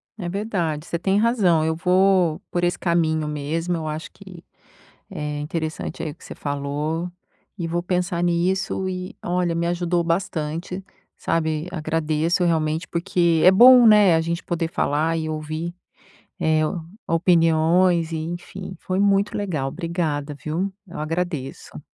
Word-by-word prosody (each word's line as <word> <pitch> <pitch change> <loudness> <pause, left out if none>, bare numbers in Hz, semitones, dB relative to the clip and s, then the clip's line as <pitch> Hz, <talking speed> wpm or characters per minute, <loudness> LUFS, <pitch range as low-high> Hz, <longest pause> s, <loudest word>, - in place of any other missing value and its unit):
É 185 -5 -5
verdade, 175 -6 -2
você 170 - -2
tem 190 +3 +1
razão, 205 -9 +3
eu 160 0 0
vou 180 -1 +3
por 175 - -1
esse 175 0 +1
caminho 160 -3 +1
mesmo, 155 +4 -2
eu 155 -1 -4
acho 155 +1 -5
que 190 -4 -13 0.7
é 150 0 -4
interessante, 160 +1 -4
aí, 160 -2 -3
o - - -13
que - - -20
você - - -8
falou 145 +4 -3 0.5
e 170 - -3
vou 175 +1 -2
pensar 180 -1 -1
nisso 185 +2 0
e 185 0 -5
olha, 175 -1 0
me 170 0 -1
ajudou 175 0 0
bastante, 170 +1 -2 0.3
sabe, 160 0 -1
agradeço, 160 +1 0
realmente, 160 0 0
porque 170 -1 +1
é 185 - +9
bom, 245 +4 +8
né, 210 -5 +7
a 160 - +2
gente 170 +1 -3
poder 170 -1 -2
falar 160 0 0
e 160 -1 -2
ouvir, 155 +2 -4 0.6
eh, 160 -2 +2 0.5
opiniões, 165 0 +3
enfim, 175 +3 -6
foi 185 0 -3
muito 200 +1 +2
legal. 170 -10 -2
Obrigada, 160 -4 -3
viu, 165 +8 -3
eu 170 - -8
agradeço. 160 -3 -4
170 Hz, 145 wpm, -23 LUFS, 155-180 Hz, 0.7 s, é